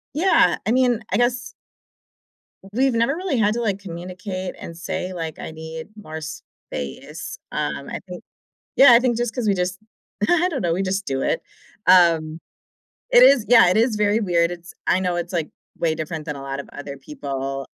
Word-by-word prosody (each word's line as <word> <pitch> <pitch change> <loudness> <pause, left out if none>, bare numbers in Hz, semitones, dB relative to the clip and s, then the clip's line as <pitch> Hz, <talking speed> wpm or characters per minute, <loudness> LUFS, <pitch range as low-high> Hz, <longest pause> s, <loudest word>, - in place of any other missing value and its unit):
yeah, 370 +5 +4
I - - +2
mean, 250 -2 +3
I - - +3
guess 240 +1 0 1.2
we've 265 +2 +3
never 230 +4 +2
really 355 -7 -1
had 210 -1 +2
to, 240 - -2
like, 200 -4 0
communicate 185 0 -6
and 165 - -8
say, 180 +2 -4
like, 165 -3 -5
"I - - -7
need 160 +1 -8
more 160 -7 -8
space," 150 - -8
um, 150 -2 -3
I - - -5
think 180 -1 -8 0.5
yeah, 270 -2 +9
I 235 - +7
think 245 -2 +1
just 240 -1 -2
'cause 245 -4 -1
we 200 - +3
just- 180 0 -2 0.5
I 350 +1 +3
don't 285 -6 -3
know- 170 -2 +1
we 185 - -1
just 195 +1 -2
do 135 0 -1
it. - - 0 0.4
Um, 165 -3 +4 0.7
it - - +7
is 275 - +6
yeah, 230 -6 +7
it - - +2
is 230 -1 +2
very 210 +1 +2
weird. 170 -4 +2
It's 175 0 -9
I 185 - +3
know 180 -2 0
it's, 175 +1 -4
like, 165 -4 -1 0.3
way 165 -2 +1
different 155 0 -5
than 150 -2 -4
a 135 - -8
lot 135 0 -4
of - - -10
other 145 -1 -7
people 135 -1 -5
180 Hz, 190 wpm, -22 LUFS, 160-230 Hz, 1.2 s, yeah